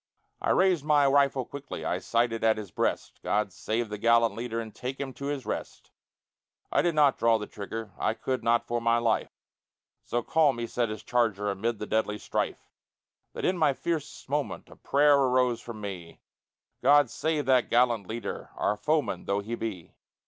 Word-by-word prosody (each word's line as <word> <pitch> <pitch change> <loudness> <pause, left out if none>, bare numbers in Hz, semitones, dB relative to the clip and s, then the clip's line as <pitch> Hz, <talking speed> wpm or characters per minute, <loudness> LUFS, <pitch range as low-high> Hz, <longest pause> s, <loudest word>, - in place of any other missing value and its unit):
I - - -1
raised 185 -6 +3
my 150 -2 +4
rifle 140 -2 +3
quickly, 140 0 -7
I - - 0
sighted 115 -1 0
at 110 -1 +4
his 105 -4 -7
breast, - - -2
God 105 -2 0
save 110 +3 -2
the 105 -1 -5
gallant 115 -1 +4
leader 115 +1 -4
And 110 -2 -6
take 130 +1 -5
him 135 -2 -4
to 140 - -7
his 140 -3 -3
rest! - - -6 0.8
I - - +3
did 170 -2 0
not 145 -3 +4
draw 115 -1 +4
the 105 - -5
trigger, 105 +1 -7
I 110 - 0
could 130 +2 -3
not 115 0 +2
for 120 0 -2
my 115 0 +3
life. 115 -2 +1 0.7
So 120 0 -2
calm 150 -4 +3
he 120 - -2
sat 120 0 -1
his 110 0 -6
charger 105 -4 +1
Amid 110 +4 -2
the 105 - -5
deadly 105 -1 0
strife, - - -3 0.7
That - - -4
in 180 -1 +1
my 150 -3 +4
fiercest 155 +1 -4
moment 145 +1 -3
A - - -14
prayer 145 +1 +4
arose 125 -3 +2
from 115 -3 -8
me 90 -5 -7 0.6
God 145 -4 +5
save 155 0 -1
that 130 -2 +3
gallant 120 -5 +2
leader, 115 +1 -5
Our 105 - 0
foeman 145 - 0
though 100 +1 0
he 110 +3 -6
be! 110 -7 -5
120 Hz, 185 wpm, -28 LUFS, 110-140 Hz, 0.8 s, God